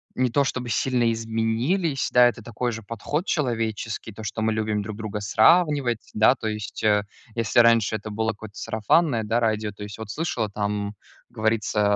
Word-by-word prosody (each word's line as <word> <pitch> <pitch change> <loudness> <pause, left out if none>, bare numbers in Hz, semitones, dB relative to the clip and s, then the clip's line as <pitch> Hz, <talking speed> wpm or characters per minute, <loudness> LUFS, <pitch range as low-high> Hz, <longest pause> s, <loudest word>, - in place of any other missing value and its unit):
не 130 -1 +1
то, 140 +3 +3
чтобы 125 -2 -3
сильно 120 +1 +1
изменились. 115 - 0
Да, 125 0 +7
это 120 -1 -3
такой 120 +1 -3
же 115 0 -6
подход 115 - -3
человеческий, 115 -6 -2
то, 110 +2 -9
что 110 +1 -4
мы 110 0 +2
любим 110 -1 -1
друг 105 0 -6
друга 110 -1 -4
сравнивать. 130 - +3
Да. 110 +4 +6
То 115 - -5
есть, 105 -2 -5
э, 105 -1 +3 0.3
если 115 +1 +2
раньше 115 -2 +5
это 110 0 -8
было 110 +1 -1
какое-то 105 -1 -11
сарафанное, 115 +3 +1
да, 115 +3 +1
радио. 110 -2 0
То 105 +1 -10
есть 105 0 -8
вот 110 -2 -7
слышала, 120 -9 -2
там, 105 0 -3 0.3
говорится, 110 -1 0
110 Hz, 180 wpm, -24 LUFS, 105-120 Hz, 0.3 s, Да